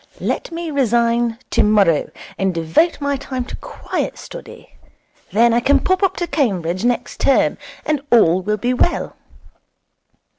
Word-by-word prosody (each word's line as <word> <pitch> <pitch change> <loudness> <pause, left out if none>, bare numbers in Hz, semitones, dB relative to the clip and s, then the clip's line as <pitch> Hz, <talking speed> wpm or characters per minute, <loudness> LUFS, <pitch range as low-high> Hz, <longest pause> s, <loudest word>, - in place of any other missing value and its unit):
Let - - -3
me 335 -1 -5
resign 235 -3 +1
tomorrow, 200 -7 +3 0.3
and 190 -2 -1
devote 165 - +1
my 285 -1 -1
time 260 -2 -5
to - - -7
quiet - - -5
study. - - -11 0.6
Then 230 +3 +4
I 235 - +3
can 275 +4 +3
pop 375 0 0
up 385 -1 +1
to 350 - -1
Cambridge 185 - -1
next 245 0 -1
term, 275 - +2 0.3
and 300 -3 0
all 185 -6 +5
will 210 +3 -1
be 245 +5 0
well.' 340 +7 0
240 Hz, 145 wpm, -19 LUFS, 205-285 Hz, 0.6 s, all